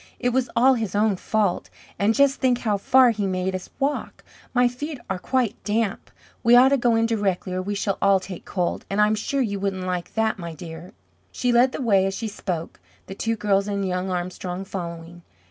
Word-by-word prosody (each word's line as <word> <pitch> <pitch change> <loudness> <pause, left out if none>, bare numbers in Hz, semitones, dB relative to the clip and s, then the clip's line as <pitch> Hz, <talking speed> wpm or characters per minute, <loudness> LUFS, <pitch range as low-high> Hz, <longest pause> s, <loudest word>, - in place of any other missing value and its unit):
It 245 - 0
was 250 0 0
all 260 +3 +5
his 225 -5 -3
own 210 -1 +3
fault. 205 0 -1 0.3
And 215 +3 +2
just 280 0 +3
think 250 -2 +2
how 210 -3 +1
far 250 +4 +5
he 205 -3 -2
made 185 0 -1
us 185 -1 -5
walk! 280 +2 -2 0.3
My 250 -1 +4
feet 285 +5 -5
are 190 - -2
quite 245 +1 -1
damp. 210 0 -1 0.3
We 235 +1 +6
ought 255 +2 +7
to 280 - +3
go 240 -2 +2
in 225 0 +3
directly 200 -5 -1
or 185 - -1
we 205 +2 -3
shall 200 -1 -1
all 195 -1 +4
take 185 -1 -8
cold, 180 -3 -2
and 195 - -1
I'm 210 0 +4
sure 270 +6 -1
you 200 -4 -3
wouldn't 190 -2 -2
like 180 -1 -4
that, 220 -2 +1
my 170 -2 -6
dear." 165 +2 -9 0.4
She 245 - 0
led 245 +2 +4
the 265 - -4
way 195 -5 +3
as 195 - -3
she 225 - -3
spoke, 180 -5 -5 0.3
the - - -8
two 225 +3 -1
girls 205 -2 +1
and 200 -1 -1
young 180 +1 -2
Armstrong 180 +1 -4
following. 170 -2 -7
205 Hz, 215 wpm, -23 LUFS, 185-235 Hz, 0.4 s, ought